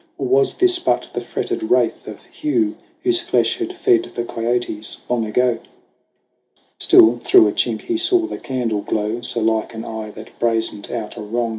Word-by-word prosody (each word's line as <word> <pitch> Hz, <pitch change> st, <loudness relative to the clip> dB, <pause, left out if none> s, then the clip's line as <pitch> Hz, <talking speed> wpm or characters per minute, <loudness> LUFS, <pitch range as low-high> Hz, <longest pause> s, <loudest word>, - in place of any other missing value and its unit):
Or -, -, -3 dB
was 400 Hz, +2 st, +2 dB
this 365 Hz, -1 st, +3 dB
but -, -, 0 dB
the -, -, -3 dB
fretted 375 Hz, -5 st, -4 dB
wraith -, -, +1 dB
of -, -, -10 dB
Hugh 315 Hz, +1 st, -1 dB, 0.3 s
Whose 360 Hz, -1 st, +4 dB
flesh 360 Hz, +2 st, 0 dB
had 365 Hz, +1 st, -4 dB
fed 360 Hz, -2 st, +2 dB
the 120 Hz, -, -2 dB
kiotes 115 Hz, -2 st, -2 dB
long 120 Hz, -2 st, -1 dB
ago? 120 Hz, +1 st, +1 dB, 1.2 s
Still 115 Hz, +2 st, +6 dB
through 110 Hz, -, +6 dB
a -, -, 0 dB
chink 115 Hz, 0 st, -1 dB
he 345 Hz, -, -2 dB
saw 350 Hz, 0 st, +4 dB
the -, -, -6 dB
candle 120 Hz, -5 st, -2 dB
glow, 110 Hz, +3 st, -3 dB
So 120 Hz, -1 st, +1 dB
like 110 Hz, +1 st, -1 dB
an 110 Hz, -, -6 dB
eye 110 Hz, -1 st, -6 dB
that 110 Hz, -, -13 dB
brazened 115 Hz, -3 st, 0 dB
out 110 Hz, -3 st, -5 dB
a -, -, -6 dB
wrong. 115 Hz, +3 st, -2 dB
120 Hz, 180 wpm, -19 LUFS, -, 1.2 s, Still